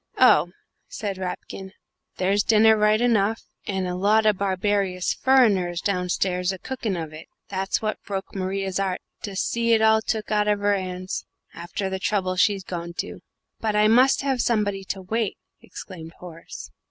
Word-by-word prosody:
"Oh," 175 -10 +6 0.4
said 200 -3 -5
Rapkin, 190 +1 -6 0.4
"there's 195 +2 +2
dinner 220 +1 +5
right 210 0 +3
enough, 225 -2 +2 0.2
and 190 -2 -1
a 180 - -2
lot 210 +4 +3
o' 215 - +5
barbarious 195 -1 0
furriners 200 -10 +3
downstairs 180 -1 0
a 190 - -5
cookin' 225 -3 -3
of 160 -2 -5
it 155 - -10 0.2
that's 195 +2 -1
what 215 0 -2
broke 195 -1 -5
Maria's 195 0 -2
'art 190 -2 -1 0.2
to 200 -2 -6
see 230 +4 +1
it 220 - +4
all 220 0 +5
took 220 -1 -3
out 210 -1 +2
of 210 0 +3
her 205 0 +2
'ands, 185 -1 -4 0.3
after 175 +4 -4
the 190 0 -3
trouble 185 -1 0
she'd 195 +1 +2
gone 170 -2 -5
to." - - -5 0.4
"But 215 -2 -1
I 210 0 +5
must 255 +5 +4
have 265 -3 +1
somebody 205 -4 0
to 190 0 -5
wait," 220 +2 -1 0.2
exclaimed 165 -4 -10
Horace. 170 -2 -10
195 Hz, 165 wpm, -24 LUFS, 185-215 Hz, 0.4 s, Oh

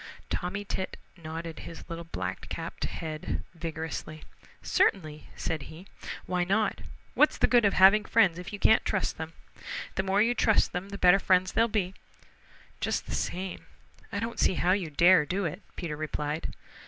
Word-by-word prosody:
Tommy 195 +3 -2
Tit 190 -1 -4 0.2
nodded 165 -1 -6
his 165 - -9
little 165 0 -6
black 95 - -5
capped - - -4
head 155 -2 -4
vigorously. 160 -1 -5 0.4
"Certainly," 155 -5 +1
said 160 -2 -2
he. 160 +4 -11 0.4
"Why 180 -1 0
not? 200 +4 +1 0.3
What's - - +4
the - - +4
good 240 -3 +4
of 200 - +3
having 195 +3 +6
friends 195 -7 +3
if 180 - -7
you 205 - -5
can't 220 +2 +5
trust 205 -5 -1
them? 160 0 -5 0.6
The - - 0
more 195 +1 +1
you 235 +2 +2
trust 220 -2 +3
them 180 +2 -4
the 200 - -6
better 180 +1 +6
friends 185 -1 +3
they'll 230 - +3
be." 195 -5 -1 0.9
"Just - - -1
the - - -6
same, 185 +1 -3 0.4
I 205 - -2
don't 230 +2 -4
see 190 - +3
how 180 - +2
you 185 -4 +1
dare 170 +2 +6
to 145 - -13
do 190 +1 0
it," 165 +5 -4
Peter 165 -4 -4
replied. 150 0 -3
180 Hz, 175 wpm, -29 LUFS, 160-200 Hz, 0.9 s, having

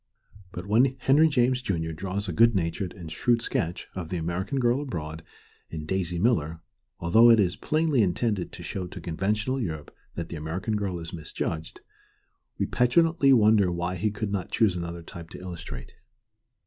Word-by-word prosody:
But 90 0 -6
when 125 +6 +3
Henry 140 +5 +5
James, 125 -2 +2
Jun., 95 -9 -1
draws 100 +4 -3
a 90 - -3
good 115 +4 +5
natured 85 +1 -1
and 85 -5 -9
shrewd 120 +6 +1
sketch 85 +1 -2
of 90 -4 -5
the 90 - -2
American 90 - -2
girl 120 +2 +2
abroad 80 - -5 0.5
in 80 -2 -6
Daisy 90 0 -1
Miller, 85 -6 +1 0.4
although 110 +8 +6
it 115 -1 +7
is 95 -2 +2
plainly 155 +2 +1
intended 100 0 0
to - - -9
show 95 -2 -4
to - - -9
conventional 105 +9 -1
Europe 80 -8 -5 0.2
that 85 -1 -4
the 85 - -5
American 85 +8 -3
girl 100 -4 -2
is 80 -1 -7
misjudged, 80 0 -5 0.8
we - - 0
petulantly 140 +3 +3
wonder 105 -6 +5
why 85 +1 -2
he 100 +4 0
could 105 0 -4
not 100 -3 -2
choose 105 -5 +2
another 85 -1 -5
type 85 0 -10
to - - -9
illustrate. 85 -8 -8
95 Hz, 175 wpm, -27 LUFS, 85-115 Hz, 0.8 s, it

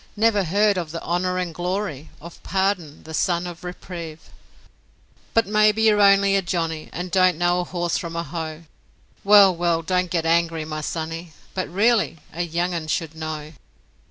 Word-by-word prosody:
Never 210 -3 +3
heard 200 +3 +2
of 170 -3 -5
the 165 +2 -5
honour 180 +1 -1
and 180 -2 -2
glory 175 -4 -3
Of 170 +2 -12
Pardon, 190 -6 -1
the 160 - -10
son 175 +2 0
of 175 -1 -8
Reprieve? 170 -3 -8 1.0
But 225 0 +4
maybe 215 +1 +3
you're 210 -2 +4
only 200 0 +5
a 195 - +3
Johnnie 165 -3 -3
And 180 +1 -5
don't 185 -3 +4
know 175 +1 +2
a 180 - -2
horse 175 -1 -2
from 170 -1 -6
a 170 - -1
hoe? 160 -2 -6 0.6
Well, 200 -2 +7
well, 170 -1 0
don't 180 +1 0
get 165 -1 -1
angry, 165 -1 +1
my 155 0 -5
sonny, 165 +1 -5 0.2
But, 185 - -3
really, 210 0 +2 0.2
a 170 - -3
young 175 +1 -1
un 165 -2 -4
should 160 0 -2
know. 155 -1 -6
175 Hz, 175 wpm, -23 LUFS, 165-190 Hz, 1.0 s, Well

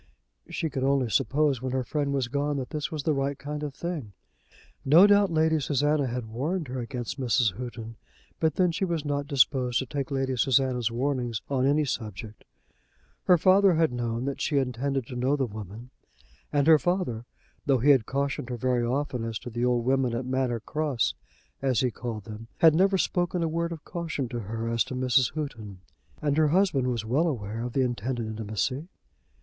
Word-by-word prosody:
She 160 - -3
could 135 -2 -2
only 135 -4 +1
suppose, 135 +3 +1
when 130 -1 -3
her 130 -1 0
friend 145 +2 -2
was 135 -3 0
gone, 145 +2 -1
that 130 -2 -5
this 150 +1 -3
was 155 -3 -4
the 155 - +2
right 140 0 -1
kind 150 +1 -5
of 145 -2 -5
thing. 155 - -5 0.7
No 160 +8 +7
doubt 205 -1 +5
Lady 160 0 +2
Susanna 145 0 +1
had 125 -1 -3
warned 145 +8 -3
her 130 +1 -4
against 120 +2 -5
Mrs. 120 -3 +2
Houghton, 115 -1 -7 0.4
but 160 -1 +1
then 180 -2 +3
she 165 - -2
was 170 -5 -1
not 145 -1 -2
disposed 130 -3 +2
to 130 - -1
take 140 0 -4
Lady 135 -2 -1
Susanna's 125 -2 +2
warnings 120 -2 -2
on 130 -1 +2
any 150 +2 +3
subject. 110 -4 -6 0.8
Her 180 - +6
father 190 +1 +5
had 160 -3 +2
known 120 0 -2
that 140 0 -3
she 145 - +1
intended 135 0 -1
to 125 - -8
know 130 +4 +1
the 135 -2 0
woman; 110 +2 -9 0.6
and 145 -1 +2
her 160 -1 +7
father, 175 -11 -1 0.4
though 135 -2 +4
he 135 +5 +5
had 130 -6 +3
cautioned 140 -2 -2
her 125 - -3
very 125 0 +1
often 125 0 -1
as 115 -1 -3
to 125 - -8
the 120 +1 -2
old 120 -1 +1
women 130 -2 +1
at 120 +2 -3
Manor 130 -3 -1
Cross, 150 -2 -1 0.5
as 130 -4 +1
he 125 -2 +1
called 115 -3 -5
them, 110 +2 -9
had 160 -2 +6
never 190 +4 +3
spoken 175 -1 0
a - - +1
word 170 +1 -2
of 165 -3 -8
caution 165 -6 -3
to 120 - -4
her 115 +2 -4
as 115 0 +1
to 130 - -6
Mrs. 125 -1 +2
Houghton. 110 -11 -6 0.4
And 145 -1 +1
her 155 -1 +4
husband 160 -6 +2
was 120 -3 -2
well 140 +10 +2
aware 110 -6 -3
of 120 -1 -5
the 135 - +2
intended 120 -1 -2
intimacy. 110 - -3
130 Hz, 200 wpm, -27 LUFS, 120-150 Hz, 0.8 s, No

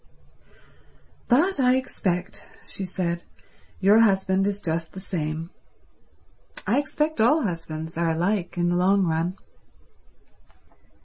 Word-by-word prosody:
"But 310 +8 +3
I 255 -1 +4
expect," 185 -8 -2 0.2
she 195 - -5
said, 175 -2 -2 0.6
"your 200 +3 +5
husband 195 -3 +3
is 205 0 -2
just 165 -2 -3
the 190 - -7
same. 165 -3 -4 1.1
I 235 +7 +2
expect 300 -1 -1
all 280 +7 +4
husbands 165 -3 -4
are 170 -1 +2
alike 175 +2 -1
in 175 - +1
the 175 0 +1
long 190 +2 +3
run." 165 +3 -1
190 Hz, 115 wpm, -25 LUFS, 170-220 Hz, 1.1 s, your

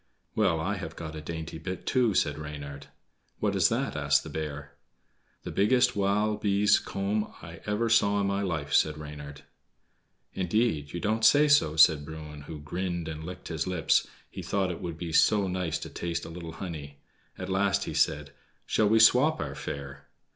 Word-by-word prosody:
"Well, 95 -7 +2
I 95 +5 -1
have 80 -2 -7
got 80 -1 -7
a 75 - -6
dainty 80 +1 -6
bit 95 0 -6
too," 120 -6 +2
said 75 -3 +1
Reynard. 70 -2 -7 0.5
"What - - 0
is - - +4
that?" - - -1
asked 70 -1 +2
the - - -8
bear. 75 -2 -5 0.7
"The - - -5
biggest 125 +5 +3
wild 105 +1 +1
bee's 100 0 +4
comb 105 +2 -2
I 85 +2 -9
ever 105 +3 0
saw 100 -2 +3
in 100 - +1
my 100 0 0
life," 80 -7 -3
said 75 -1 +3
Reynard. 75 -2 -9 0.9
"Indeed, 90 -6 0
you 85 - -4
don't 110 +4 -1
say 145 +7 +6
so," 140 - +4
said 80 -1 +6
Bruin, 75 -1 -9
who 80 -2 -7
grinned 85 +2 -3
and 80 -1 -6
licked 90 +3 -8
his 80 0 -2
lips, 90 -4 +2 0.2
he - - -8
thought 95 -2 -1
it 85 - -7
would 85 -2 -5
be 85 -1 -5
so 100 +3 +4
nice 90 -3 -1
to - - -7
taste 85 -1 -3
a - - -8
little 85 -1 -8
honey. 75 -6 -7 0.4
At 95 - -5
last 100 +1 +1
he - - -5
said: 75 -1 +1 0.3
"Shall 105 -2 +2
we 110 +1 +5
swap 130 +8 +5
our 70 -3 -3
fare?" 70 0 -7
85 Hz, 185 wpm, -28 LUFS, 75-100 Hz, 0.9 s, say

